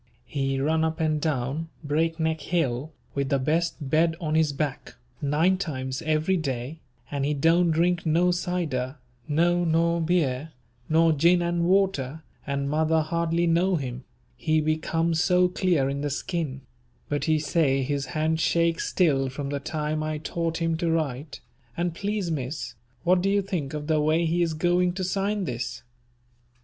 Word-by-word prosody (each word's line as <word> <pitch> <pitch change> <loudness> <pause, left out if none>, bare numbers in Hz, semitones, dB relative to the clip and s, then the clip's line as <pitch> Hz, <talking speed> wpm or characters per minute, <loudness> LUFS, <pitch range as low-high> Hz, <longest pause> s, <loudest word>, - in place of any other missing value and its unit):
He 135 -1 -1
run 160 +3 +1
up 160 +1 -1
and 155 -2 +1
down 150 +1 -1
Breakneck 160 +1 0
hill, 145 -3 -1 0.2
with 140 -1 -1
the 140 - +3
best 155 +2 -1
bed 160 +3 +2
on 155 -3 -2
his 155 -2 +3
back, 145 -1 -4 0.3
nine 160 +6 +2
times 130 -6 -3
every 155 +4 +1
day, 135 -1 -4 0.3
and 140 -1 -1
he 150 +1 +1
don't 165 +4 +3
drink 170 +2 +2
no 170 +3 +3
cider, 170 -8 -2 0.3
no 175 +3 +2
nor 170 +1 +2
beer, 155 -3 0 0.4
nor 165 +1 +4
gin 170 +4 +4
and 170 0 0
water, 170 -6 +1 0.2
and 140 0 -1
mother 160 +2 +2
hardly 170 +1 0
know 175 +3 +3
him, 130 -4 -4 0.3
he 155 +4 +1
be 155 0 +1
come 165 +1 0
so 180 +2 +3
clear 180 -6 +1
in 140 +1 -2
the 145 - -1
skin; 145 -2 -3 0.5
but 145 0 -1
he 155 -1 +3
say 145 -3 +1
his 140 0 -2
hand 160 +1 +1
shake 170 0 +2
still 140 -7 +2
from 140 +1 -5
the 140 0 -2
time 155 +1 -2
I 155 0 -2
taught 165 +1 -2
him 165 -1 0
to 170 0 0
write, 150 -3 -2 0.4
and 175 0 0
please, 200 0 -2
Miss, 135 -3 -4 0.3
what 180 +1 +4
do 195 - +1
you 200 0 +2
think 160 -7 -3
of 150 -1 -4
the 155 -1 +2
way 155 +3 +2
he 170 +2 +1
is 165 -2 0
going 175 +2 +2
to 190 +1 -3
sign 195 +2 -1
this? 125 -6 -4
160 Hz, 170 wpm, -26 LUFS, 145-170 Hz, 0.5 s, nor